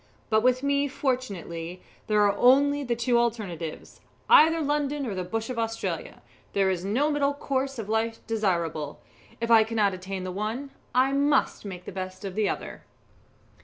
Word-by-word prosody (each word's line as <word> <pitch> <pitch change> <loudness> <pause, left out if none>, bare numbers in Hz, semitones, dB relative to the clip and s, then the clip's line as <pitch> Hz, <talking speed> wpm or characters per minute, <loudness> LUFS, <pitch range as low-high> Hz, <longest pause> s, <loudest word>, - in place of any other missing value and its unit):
But 220 0 +4
with 255 +2 +2
me, 280 0 +2
fortunately, 195 - -3 0.2
there 210 -1 +3
are 200 -1 +3
only 285 +5 +4
the 240 -3 -1
two 235 +1 +2
alternatives, 200 -9 -3 0.3
either 325 +2 +7
London 290 -1 -1
or 220 - -3
the 185 -1 -3
bush 225 +6 -3
of 240 - -4
Australia 225 0 -3 0.3
there 195 -1 +2
is 180 -1 -3
no 255 +10 +1
middle 285 -1 +1
course 270 -1 -2
of 220 -3 -5
life 225 +1 -1
desirable. 170 -9 -1 0.4
If 230 0 -1
I 225 -1 +8
cannot 215 -3 +1
attain 185 +1 -5
the 185 - -4
one, 220 +8 -4 0.2
I 260 +2 +4
must 280 -4 +1
make 180 -3 -7
the - - -6
best 185 +1 -6
of 195 - -4
the 210 +1 +1
other." - - -5
225 Hz, 170 wpm, -26 LUFS, 195-270 Hz, 0.4 s, I